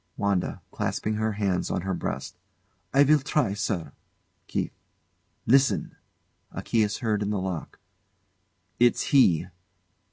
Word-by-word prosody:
WANDA. 100 -3 -1
[Clasping 110 - -2
her 110 0 0
hands 100 -3 -1
on - - -1
her 95 +1 -2
breast] 70 -6 -4 0.6
I 140 +1 +6
will 150 +2 +5
try, 140 -6 0
sir. 100 -4 -2 0.6
KEITH. - - -2 0.7
Listen! 135 +3 +3 0.6
[A - - -6
key 115 - +1
is 105 0 0
heard 105 -2 +1
in 105 - -1
the 105 - 0
lock.] 95 -3 -5 1.0
It's 120 0 +4
he! 90 - +5
105 Hz, 130 wpm, -26 LUFS, 95-120 Hz, 1.0 s, I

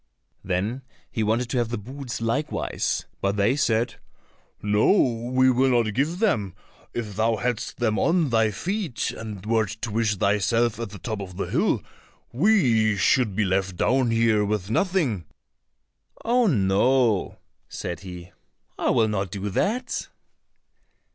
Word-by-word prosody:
Then 100 +8 -2 0.3
he 115 - -2
wanted 110 +3 +1
to 125 - +1
have 120 -2 0
the 120 - -2
boots 125 +3 -7
likewise, 125 +7 -1 0.2
but 100 +1 0
they 105 +5 +2
said, 115 -4 0 0.6
"No, 105 +1 +2 0.4
we 130 0 +4
will 130 +2 +3
not 110 -1 -3
give 150 +8 0
them; 110 - 0 0.4
if 110 -4 -5
thou 110 +2 +2
hadst 120 +1 -3
them 110 -3 0
on 165 -5 +2
thy 110 -1 +3
feet 160 - -2
and 105 -3 -8
wert 110 -1 0
to 115 - -2
wish 110 0 +1
thyself 105 +4 +1
at 115 -2 -4
the 105 - -9
top 110 0 -4
of 90 -2 -8
the - - -1
hill, - - +1 0.5
we 120 - +3
should 105 +1 +2
be 105 0 +1
left 95 0 0
down 130 +6 +2
here 115 -2 +3
with 105 -1 -2
nothing." 140 - 0 1.0
"Oh, 240 0 +3
no," 110 - +2 0.3
said 85 - -5
he, 90 -1 -10 0.5
"I - - +1
will 110 - +3
not 100 -3 -2
do 100 +2 -4
that." 235 - -1
115 Hz, 150 wpm, -24 LUFS, 100-130 Hz, 1.0 s, we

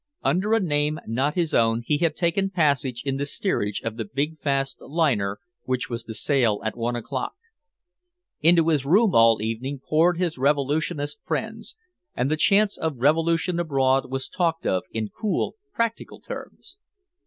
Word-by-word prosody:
Under 185 +11 +2
a - - +3
name 150 -4 0
not 130 +6 0
his 170 -3 0
own 115 0 +2
he 145 +3 +1
had 160 -2 +1
taken 190 +2 +1
passage 140 -8 0
in 135 -1 -1
the 140 - -1
steerage 105 - -1
of 115 0 -4
the 115 - -2
big 145 +8 -3
fast 135 -1 -1
liner 130 -11 0 0.3
which 130 -1 -2
was 115 0 -3
to 110 - -7
sail 120 -3 +2
at 110 - -2
one 120 +1 -2
o'clock. 120 - -4 1.1
Into 165 0 +4
his 150 -5 +2
room 190 +7 +4
all 115 -2 +5
evening 120 +6 -3
poured 165 +3 +3
his 170 -6 -1
revolutionist 145 +1 0
friends, 225 - -4 0.4
and 130 +4 0
the - - +3
chance 200 +6 +3
of 160 -4 -2
revolution 165 +6 +2
abroad 135 -5 +1
was 135 0 -3
talked 165 -2 -1
of 95 - +1
in 110 -2 -3
cool 215 - -2 0.2
practical 230 - -3
terms. 370 - -10
145 Hz, 165 wpm, -24 LUFS, 125-170 Hz, 1.1 s, all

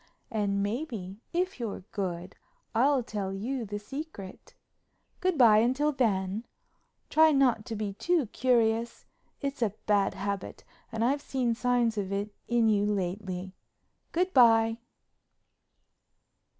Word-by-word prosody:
And, 200 -3 0
maybe, 210 -4 -4
if 365 -2 -1
you're 220 -5 -4
good, 180 -2 -4 0.4
I'll 260 +3 +3
tell 205 -4 -4
you 235 +6 -3
the 205 0 -4
secret. 210 -3 -8 0.6
Good 370 -3 0
bye 225 -5 +7
until 260 +6 +2
then—try 230 +7 0
not 255 -6 +3
to 225 - -4
be 210 -2 -3
too 340 - +1
curious. 230 0 +1 0.4
It's 280 -3 -3
a 210 -3 0
bad 205 -2 +2
habit 200 -1 -4 0.3
and 225 0 0
I've 280 +3 +1
seen 255 -4 0
signs 240 -2 +1
of 195 -1 -3
it 200 +1 -2
in 235 -1 +3
you 205 -2 +3
lately. 190 -1 -3 0.6
Good 365 +2 0
bye." 225 -2 +5
225 Hz, 125 wpm, -29 LUFS, 200-255 Hz, 0.6 s, bye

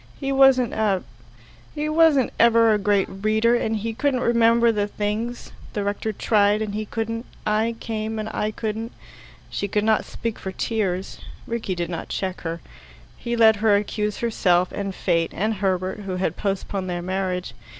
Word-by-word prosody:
He 275 -1 -2
wasn't 270 -3 +5
a 205 -4 +1 0.7
he 300 0 -2
wasn't 310 -4 +4
ever 230 -1 +5
a 210 - +1
great 200 -1 +2
reader, 215 +4 +1
and 225 -2 0
he 225 +2 -3
couldn't 260 +1 0
remember 235 0 +4
the 205 -2 0
things. 215 +4 -3 0.2
The 205 - -2
rector 205 +2 -2
tried, 205 0 +2
and 215 -2 -3
he 215 0 -3
couldn't 230 +1 -3 0.2
I 220 +2 +1
came, 220 -1 -3
and 215 0 -3
I 210 - -1
couldn't 220 +1 -4 0.3
" - - -23
She 200 - -2
could 210 +1 0
not 220 0 +3
speak 230 -1 -5
for 190 - -5
tears. 195 -4 -2 0.3
Rickie 225 -5 -3
did 175 0 -3
not 170 - -5
check 190 -1 -3
her. 165 0 -4 0.5
He 235 0 -3
let 220 -2 +6
her 210 -1 +4
accuse 210 0 -1
herself, 185 -6 +2
and 195 -2 -4
fate, 165 0 +1
and 215 +4 0
Herbert, 185 0 0
who 195 -2 -4
had 180 -3 -1
postponed 195 -1 -3
their 175 -1 -3
marriage. 185 -4 -2
215 Hz, 175 wpm, -23 LUFS, 195-230 Hz, 0.7 s, let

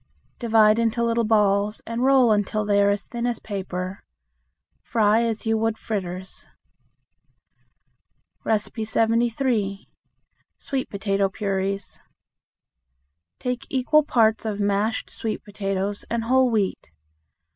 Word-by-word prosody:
Divide 220 -2 +4
into 230 0 +1
little 230 0 +1
balls 210 -1 +2
and 230 +2 -3
roll 260 -3 +5
until 210 0 0
they 205 0 +3
are 200 - +4
as 200 0 -1
thin 240 0 -3
as 240 -2 -1
paper. 190 -2 -5 0.8
Fry 220 -1 +2
as 230 -1 -2
you 225 0 +1
would 225 0 0
fritters. 190 -3 -5 2.0
73. 225 0 0 0.7
Sweet 270 -3 -4
Potato 195 -1 0
Puris. 195 0 -3 1.4
Take 250 +1 -4
equal 275 +4 +3
parts 225 -6 +2
of 215 -2 -3
mashed 205 +2 0
sweet 220 -1 -4
potatoes 200 -1 -3
and 235 -1 -1
whole 255 +2 +3
wheat. 210 - -1
220 Hz, 110 wpm, -24 LUFS, 200-230 Hz, 2.0 s, roll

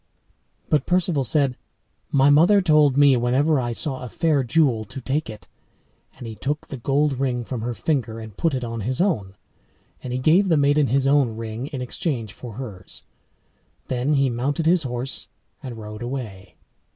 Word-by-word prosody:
But 150 -3 +1
Perceval 175 -5 +1
said, 135 +1 +1 0.6
"My 140 +1 +5
mother 175 +8 +6
told 150 -6 +4
me 145 -2 +6
wheresoever 130 +5 +2
I 120 -1 -2
saw 130 +3 -3
a 125 - -6
fair 155 -2 +1
jewel 125 -3 +2
to 130 +4 -9
take 135 +3 -2
it," 110 - -10 0.7
and 130 - -9
he 115 - -6
took 145 +7 -3
the 135 - -5
gold 140 +2 0
ring 125 -3 -1
from 125 -2 -4
her 120 +1 -3
finger, 115 -8 -1
and 110 -3 -9
put 165 -5 0
it 130 - -3
on 115 -1 -4
his 125 +5 -2
own; 110 - 0 0.7
and 125 - -6
he 125 - -1
gave 170 +9 +3
the 165 - +4
maiden 145 0 +3
his 135 +3 +1
own 135 -5 +2
ring 115 +3 -5
in 135 -4 -5
exchange 120 - -3
for 120 -3 -9
hers; 100 -7 -8 0.9
then 130 +3 0
he 135 -1 +3
mounted 135 +6 -1
his 175 +1 +4
horse 125 -1 -4 0.3
and 125 -5 -7
rode 105 -1 -8
away. 120 -6 -6
130 Hz, 180 wpm, -23 LUFS, 120-145 Hz, 0.9 s, mother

